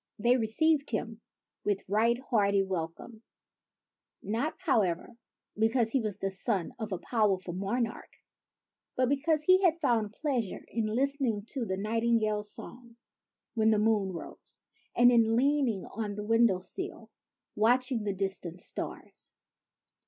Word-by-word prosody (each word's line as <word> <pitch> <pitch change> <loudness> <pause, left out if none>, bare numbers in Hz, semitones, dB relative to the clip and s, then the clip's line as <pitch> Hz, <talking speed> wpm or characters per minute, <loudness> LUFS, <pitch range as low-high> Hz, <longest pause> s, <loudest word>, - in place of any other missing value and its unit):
They 240 +4 +3
received 280 +6 +1
him 225 0 -4 0.4
with 205 -2 -1
right 225 +4 +2
hearty 200 -3 +3
welcome, 190 +4 -5 0.5
— - - -44 0.2
not, 305 +5 -1
however, 220 - 0 0.4
because 225 +1 +2
he 270 - +2
was 210 -3 -3
a 195 - 0
son 190 -1 -2
of 220 -2 -4
a 185 - -1
powerful 195 -5 0
monarch, 225 +6 -2 0.9
but 255 -1 +2
because 300 +2 +1
he 370 +4 +5
had 340 -2 +3
found 225 -8 +1
pleasure 250 - -2
in 225 -2 -1
listening 250 -2 0
to 260 -5 -3
the 190 - -2
nightingale's 215 0 0
song 235 -1 -10 0.6
when 220 -1 +3
the 220 - +4
moon 210 -2 +2
rose, 170 - -10 0.4
and 245 +1 +6
in 225 -2 +4
leaning 260 -5 +1
on 210 -1 -5
the 210 - -5
window 225 -4 +3
sill, 375 - -6 0.4
watching 245 +1 +2
the 200 -1 -1
distant 190 -3 -3
stars. - - -7
225 Hz, 135 wpm, -30 LUFS, 205-250 Hz, 0.9 s, and